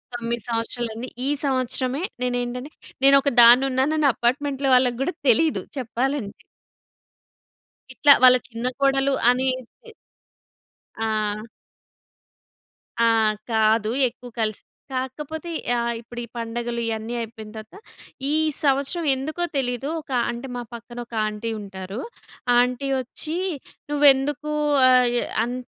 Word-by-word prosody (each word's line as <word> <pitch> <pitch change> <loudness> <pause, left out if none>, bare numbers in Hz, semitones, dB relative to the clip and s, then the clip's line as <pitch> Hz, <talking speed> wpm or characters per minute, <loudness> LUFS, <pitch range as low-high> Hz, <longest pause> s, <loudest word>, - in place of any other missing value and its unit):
9 235 -1 -3
సంవత్సరా‌లయింది. 230 0 -2 0.2
ఈ - - +1 0.2
సంవత్సరమే 260 +1 -1 0.2
నేనేంటంటే 250 +2 -3 0.3
నేనొక 275 +1 +6
దాన్ను‌న్నానని 265 +5 +5
అపార్ట్‌మెంట్‌లో 270 +2 0
వాళ్ళకి 250 -1 +2
గూడా 355 +7 -1 0.2
తెలీదు 305 +7 +3 0.2
చెప్పాలంటే. 250 -2 -3 1.5
ఇట్లా 285 +2 +7
వాళ్ళ 255 0 +9
చిన్న 230 +1 -3
కోడలు 275 0 +2 0.2
అనేది 255 - -2 1.1
ఆ! 215 -2 -1 1.6
ఆ! 230 - +4 0.4
కాదు. 220 0 +2 0.2
ఎక్కువ 245 +1 -13
కలిసి 215 -1 -2 0.3
కాకపోతే 300 +6 -5 0.2
యా 240 -1 +1 0.2
ఇప్పుడు 240 +1 -10
ఈ - - -5
పండగలు 235 +1 -3
ఇయన్నీ 225 +1 -3
అయిపోయిన 225 -1 -7
తర్వాత, 215 - -11 0.6
ఈ - - +1 0.3
సంవత్సరం 280 +4 +1
ఎందుకో 305 +6 -3
తెలీదు 245 0 -2
ఒక 300 - -13 0.2
అంటే 240 +3 -5
మా 245 - -3
పక్కన 235 +1 -10
ఒక 235 - -19
ఆంటీ 215 +2 -4
ఉంటారు. 195 +1 -7 0.6
ఆంటీ 250 +2 +1
ఒచ్చి 305 +6 -6 0.5
నువ్వెందుకు 290 +1 +3 0.4
ఆయే 245 -1 +4 0.2
అన్ 240 +2 -3
250 Hz, 105 wpm, -23 LUFS, 230-275 Hz, 1.6 s, వాళ్ళ